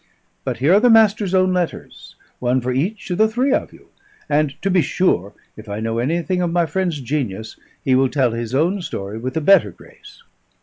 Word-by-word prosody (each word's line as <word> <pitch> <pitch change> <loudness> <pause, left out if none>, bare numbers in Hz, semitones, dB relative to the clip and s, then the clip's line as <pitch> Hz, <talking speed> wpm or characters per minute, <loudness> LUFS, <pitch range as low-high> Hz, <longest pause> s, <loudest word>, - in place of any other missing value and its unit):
But - - -3
here 145 +7 +3
are 200 - +6
the 245 - +4
Master's 215 -4 +4
own 185 0 +3
letters; 180 -2 -4 0.2
one 125 +1 +1
for 125 0 -3
each 180 - -3
of 180 - -2
the 220 - +5
three 250 +5 0
of - - -1
you; - - -19 0.4
and 145 -1 0
to 195 - +1
be 180 -1 +4
sure 100 - 0 0.2
(if 110 0 -12
I 100 +1 -4
know 115 +1 -2
anything 170 +7 -1
of 175 -1 -1
my 175 0 +2
friend's 170 -1 -2
genius) 115 -6 -4 0.3
he 130 - +1
will 130 +1 +3
tell 130 -4 +1
his 115 +2 -4
own 175 +7 +1
story 100 - -6
with 130 +5 -4
a - - 0
better 170 - +5
grace." - - -17
155 Hz, 210 wpm, -20 LUFS, 125-185 Hz, 0.4 s, are